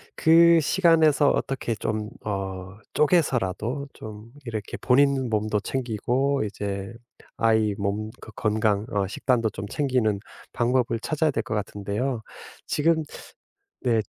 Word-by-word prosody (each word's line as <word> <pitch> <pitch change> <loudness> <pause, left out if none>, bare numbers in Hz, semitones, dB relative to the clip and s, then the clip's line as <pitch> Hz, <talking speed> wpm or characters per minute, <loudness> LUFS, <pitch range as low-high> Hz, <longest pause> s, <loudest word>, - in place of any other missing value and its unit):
그 170 +1 +6
시간에서 160 -4 +4
어떻게 130 -4 -1
좀 105 0 -3 0.2
어 95 -2 -4 0.2
쪼개서라도 140 - +1
좀 110 +2 -10
이렇게 110 -4 -5
본인 135 -1 +3
몸도 110 -1 0
챙기고 130 +3 -1
이제 100 0 -4 0.5
아이 110 -2 +2
몸 100 +2 -2
거 110 - -11
건강 105 -1 +1 0.2
식단도 115 0 0
좀 100 - -6
챙기는 125 -7 0 0.3
방법을 120 -1 +1
찾아야 155 +3 0
될 115 -3 -2
것 - - -5
같은데요. 105 +4 -2 0.5
지금 160 +1 +2 0.8
네. 115 -3 +2
115 Hz, 235 characters per minute, -25 LUFS, 105-140 Hz, 0.8 s, 그